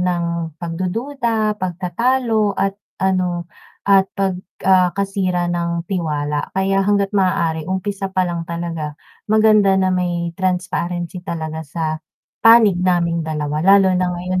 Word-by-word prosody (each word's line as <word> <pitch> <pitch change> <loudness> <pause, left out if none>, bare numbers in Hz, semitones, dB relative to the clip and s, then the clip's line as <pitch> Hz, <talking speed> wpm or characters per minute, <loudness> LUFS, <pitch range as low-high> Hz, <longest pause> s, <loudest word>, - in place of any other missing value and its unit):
ng 170 -3 -2
pagdududa, 215 - -2
pagtatalo 210 +4 0
at 195 +1 -1 0.2
ano, 180 -2 0 0.4
at 195 -1 +4
pag, 190 -2 -1 0.2
ah, 185 -1 +5
kasira 185 -3 -1
ng 170 -1 -2
tiwala. 150 -5 -2
Kaya 195 0 +2
hangga't 200 0 +1
maaari 170 -5 0
umpisa 195 +1 -2
pa 185 -1 0
lang 170 -2 -4
talaga 165 -3 -4 0.3
maganda 215 -2 +4
na 190 -1 +2
may 175 -2 -1
transparency 180 -1 -2
talaga 160 -3 -5
sa 160 +2 -5 0.6
panig 225 -5 +6
naming 170 -2 +1
dalawa, 150 -1 -2
lalo 195 +2 +5
na 180 0 +1
ngayon 180 +1 -2
180 Hz, 125 wpm, -19 LUFS, 170-195 Hz, 0.6 s, panig